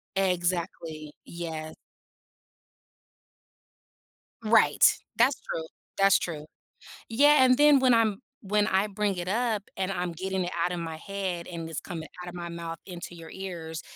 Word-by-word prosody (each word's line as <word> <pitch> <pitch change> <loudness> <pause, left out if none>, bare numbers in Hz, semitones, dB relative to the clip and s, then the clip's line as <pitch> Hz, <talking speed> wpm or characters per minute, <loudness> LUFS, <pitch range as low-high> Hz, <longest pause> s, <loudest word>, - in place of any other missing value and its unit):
Exactly, 170 -4 -1
yeah. 160 -2 -6 2.7
Right, 225 0 +5 0.2
that's 250 +3 +4
true, 160 - -4 0.3
that's 195 0 +5
true, 155 -3 -5 0.6
yeah, 290 +4 +6
and 255 -1 +5
then 295 -1 +7
when 260 -1 +4
I'm 220 -2 +2 0.2
when 210 0 +1
I 190 +2 +2
bring 205 -1 -1
it 175 - -4
up 220 0 0
and 190 0 -1
I'm 180 -2 -2
getting 190 +2 -2
it 175 - -3
out 180 - 0
of 175 - -3
my 165 -1 -5
head, 185 -1 -4
and 165 -2 -6
it's 160 - -4
coming 165 -4 -6 0.2
out 180 - -6
of 175 - -10
my 175 -1 -5
mouth 170 -1 -6
into 175 -1 -8
your 165 -1 -11
ears, 170 -4 -6
180 Hz, 150 wpm, -28 LUFS, 170-210 Hz, 2.7 s, then